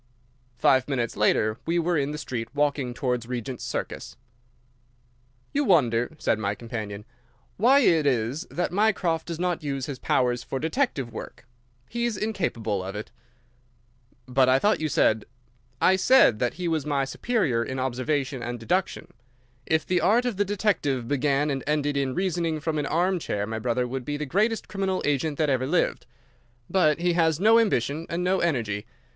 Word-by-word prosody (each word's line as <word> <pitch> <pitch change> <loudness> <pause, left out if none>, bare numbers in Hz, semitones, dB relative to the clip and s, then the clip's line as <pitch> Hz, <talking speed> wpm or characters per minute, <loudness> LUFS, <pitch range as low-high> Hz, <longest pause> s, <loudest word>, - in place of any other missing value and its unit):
Five 130 +2 +3
minutes 125 -5 -2
later 110 +1 +2
we 170 +1 +1
were 170 +1 +1
in 140 -2 0
the 150 - -4
street, 120 -6 -4
walking 145 -3 0
towards 125 -3 -2
Regent's 125 0 -5
Circus. - - -5 1.4
"You 290 - +2
wonder," 125 - +2
said 110 - 0
my 100 -1 -1
companion, 105 -3 -6 0.5
"why 260 +7 +5
it 160 - +3
is 130 - 0
that 175 - -2
Mycroft 185 -5 +1
does 170 -2 -4
not 180 -1 -1
use 135 -3 -3
his 140 -3 -6
powers 125 -1 +1
for 135 - -4
detective 160 - -1
work. 115 - -9 0.4
He 235 +1 -2
is 235 -4 -1
incapable 120 - -2
of 95 +2 -6
it." 105 - -6 1.2
"But 130 0 +3
I 130 - +5
thought 205 +9 +2
you 155 -1 -1
said—" 110 -5 +2 0.5
"I 190 +1 +4
said 190 - +5
that 125 - 0
he 180 -1 -3
was 160 -3 0
my 140 -2 0
superior 135 - 0
in 130 +2 -5
observation 130 +1 -1
and 120 +1 -4
deduction. 180 - -1 0.6
If 160 -1 +1
the 180 -1 +1
art 220 +8 +3
of 245 -4 -1
the 205 - +3
detective 180 - 0
began 145 +2 +1
and 135 -1 -3
ended 145 -1 0
in 135 -2 -1
reasoning 170 -4 -1
from 155 0 -2
an 145 - -2
armchair, 170 - 0
my 110 +1 -4
brother 125 +2 0
would 130 +1 -4
be 145 0 -2
the 150 - -3
greatest 215 - 0
criminal 195 -2 -2
agent 145 +1 0
that 155 -3 +1
ever 130 0 0
lived. 175 +5 0 0.6
But 155 -6 +3
he 175 +1 +1
has 165 -2 +2
no 220 +4 +6
ambition 160 - 0
and 170 +1 -2
no 185 +1 +2
energy. 115 -11 -1
145 Hz, 175 wpm, -25 LUFS, 125-180 Hz, 1.4 s, no